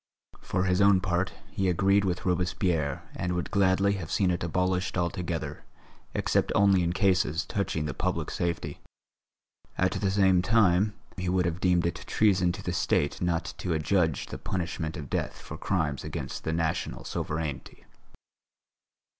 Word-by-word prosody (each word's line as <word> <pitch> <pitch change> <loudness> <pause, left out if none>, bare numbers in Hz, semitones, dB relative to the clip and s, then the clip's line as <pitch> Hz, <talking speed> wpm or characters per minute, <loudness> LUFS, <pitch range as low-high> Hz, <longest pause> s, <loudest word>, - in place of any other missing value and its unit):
For 90 0 -1
his 90 0 +2
own 100 -1 +6
part, 90 0 -1 0.2
he 95 -1 0
agreed 100 +3 +3
with 90 -1 -2
Robespierre 90 -5 0
and 90 0 -2
would 90 0 -3
gladly 100 0 +3
have 80 - -7
seen 95 -3 +2
it 85 - -2
abolished 90 +2 0
altogether, 85 -1 -3 0.5
except - - +1
only 100 -2 +5
in 85 -1 +1
cases 95 -2 +2
touching 90 -6 -2
the 75 - -3
public - - -2
safety. 85 -1 -2 1.0
At - - +2
the 100 - 0
same 95 -2 +4
time, 105 0 +3 0.2
he 90 0 -2
would 90 0 +2
have 85 0 -1
deemed 90 -2 +3
it 85 0 -2
treason 95 -4 +3
to - - -8
the - - -2
State 75 0 0
not 85 -1 -1
to 90 - -1
adjudge 80 -1 +1
the - - -8
punishment 85 -3 -3
of 75 - -6
death - - -3
for - - -8
crimes 80 -7 -1
against - - -5
the 80 - 0
National 80 -1 -2
Sovereignty. 75 -5 -4
90 Hz, 155 wpm, -28 LUFS, 85-95 Hz, 1.0 s, own